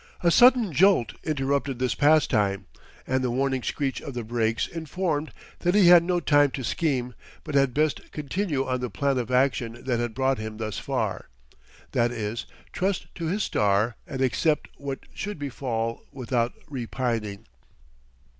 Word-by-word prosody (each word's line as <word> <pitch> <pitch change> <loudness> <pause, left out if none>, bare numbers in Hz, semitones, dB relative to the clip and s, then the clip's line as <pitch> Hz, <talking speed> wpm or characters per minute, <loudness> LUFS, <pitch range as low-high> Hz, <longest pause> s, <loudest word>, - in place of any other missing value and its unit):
A 170 - +3
sudden 245 -2 +6
jolt 175 - +4
interrupted 140 -2 -1
this 125 0 0
pastime, 110 - +3 0.4
and 130 0 0
the 125 - +1
warning 130 +1 0
screech 135 +1 -2
of 140 - -7
the 120 - -3
brakes 115 0 0
informed 160 -1 -3 0.3
that 175 +2 +1
he 195 -4 +7
had 175 -1 +9
no 175 0 +1
time 145 -3 +4
to 130 - -4
scheme, 125 -3 -1 0.3
but 155 - -6
had 135 -2 +3
best 150 +3 -1
continue 150 -1 -2
on 130 0 -1
the 125 -1 -3
plan 135 +7 0
of 120 -1 -3
action 125 -2 0
that 125 -3 0
had 120 -2 -3
brought 130 -1 +1
him 110 0 -6
thus 110 -1 -4
far 115 -7 -3 0.6
that 120 0 +2
is, 110 -1 -4 0.3
trust 190 +1 -2
to 170 - -5
his 200 +5 0
star 105 +3 +1
and 130 - -4
accept 150 +4 +1
what 140 -1 -5
should 205 -1 -5
befall 120 -5 -3
without 120 -2 -1
repining. 115 -6 -3
130 Hz, 160 wpm, -26 LUFS, 120-155 Hz, 0.6 s, had